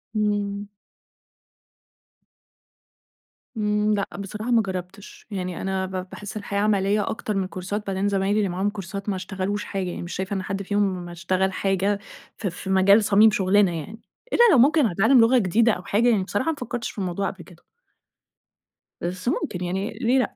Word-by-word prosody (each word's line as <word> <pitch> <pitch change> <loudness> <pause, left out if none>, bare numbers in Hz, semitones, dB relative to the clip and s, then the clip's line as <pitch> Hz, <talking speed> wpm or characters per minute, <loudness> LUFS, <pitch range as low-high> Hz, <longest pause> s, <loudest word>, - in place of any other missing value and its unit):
امم. 205 -1 -1 2.9
امم، 210 0 +1
لأ، 200 -1 0
بصراحة 210 +4 -4
ما 230 -1 +5
جربتش، 190 0 -7
يعني 185 -3 -4
أنا 190 0 -1
ب 185 0 -5
باحس 210 +1 -7
الحياة 200 -1 -3
عملية 205 0 +1
أكتر 215 -1 -3
من 190 -1 0
كورسات 195 +3 -5
بعدين 195 +1 0
زمايلي 200 +1 +1
اللي 200 -3 +1
معاهم 190 +3 0
كورسات 200 0 -6
ما 195 - 0
اشتغلوش 195 +2 -3
حاجة 190 -2 -3
يعني، - - -5
مش 175 - -6
شايفة 190 +1 -3
إن 190 -1 -2
حد 195 +1 -3
فيهم 190 -3 -1
اشتغل 185 +2 -1
حاجة 195 +1 0 0.4
ف 210 - -3
في 185 +1 -6
مجال 195 +3 +5
صميم 210 +1 +6
شُغلنا 195 0 +3
يعني. 180 +7 -7 0.3
إلا - - +1
لو 290 - +6
ممكن 290 +4 +5
هيتعلم 220 +9 +4
لغة 240 +3 +5
جديدة 225 +3 +3
أو 180 - -4
حاجة 230 +6 +2
يعني، 205 -5 +2
بصراحة 205 +9 -1
ما - - -4
فكرتش 245 -1 -4
في - - -21
الموضوع 195 0 -2
قبل 185 -3 -10
كده. 175 -2 -18 1.4
بس 180 +4 -4
ممكن 180 -7 -1
يعني، 190 +3 -2
ليه 250 +2 +3
لأ؟ 250 - -1
200 Hz, 170 wpm, -24 LUFS, 185-210 Hz, 2.9 s, صميم